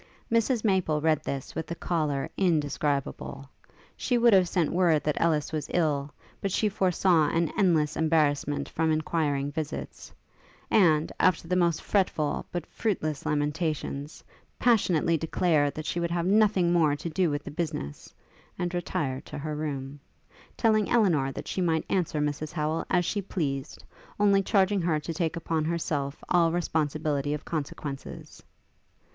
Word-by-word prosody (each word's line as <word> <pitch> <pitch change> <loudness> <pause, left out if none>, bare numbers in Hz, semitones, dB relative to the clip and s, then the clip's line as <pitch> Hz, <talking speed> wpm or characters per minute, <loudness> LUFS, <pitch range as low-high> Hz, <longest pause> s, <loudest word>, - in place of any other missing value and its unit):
Mrs 230 0 +2
Maple 185 -7 +2
read 155 -1 +2
this 135 -3 -5
with 160 - -5
a 170 - -3
choler 150 -6 -1
indescribable. 145 -5 -1 0.5
She 245 - 0
would 235 -1 +5
have 185 -3 +5
sent 170 -5 +1
word 170 -4 +3
that 150 0 -1
Ellis 155 -3 +1
was 155 -3 -3
ill, 145 -4 0 0.3
but 195 - -1
she 210 +3 +1
foresaw 180 -4 +2
an 165 -1 0
endless 160 -5 +2
embarrassment 145 -3 +1
from 160 0 0
inquiring 150 -3 0
visits; 155 +1 -6 0.6
and, 160 -7 +4
after 175 -2 +2
the 180 - 0
most 170 -3 +1
fretful, 160 -7 0
but 175 -3 -3
fruitless 155 -9 -2
lamentations, 150 -1 -2 0.3
passionately 180 -8 +3
declared 155 -3 +1
that 155 - -5
she 175 - -2
would 170 0 -1
have 170 0 -1
nothing 195 -3 +3
more 155 -4 +3
to 145 - -6
do 175 +1 +1
with 145 0 -2
the - - -7
business, 150 - -5 0.5
and 175 -1 -2
retired 165 -7 -2
to - - -7
her 150 +1 -4
room; 145 -2 -4 0.6
telling 215 -3 +2
Elinor 170 - +3
that - - -7
she 185 - -2
might 165 -3 +1
answer 170 -5 0
Mrs 150 +1 -2
Howel 155 0 -1
as 180 -1 +2
she 205 +3 -1
pleased, 140 -8 -4 0.4
only 200 -1 +4
charging 195 0 +2
her 165 -3 +1
to 165 +2 -5
take 160 0 -1
upon 165 -1 -1
herself 155 -4 -2
all 170 -2 +3
responsibility 150 -3 -1
of 150 - -9
consequences. 145 -3 -6
160 Hz, 150 wpm, -27 LUFS, 150-180 Hz, 0.6 s, would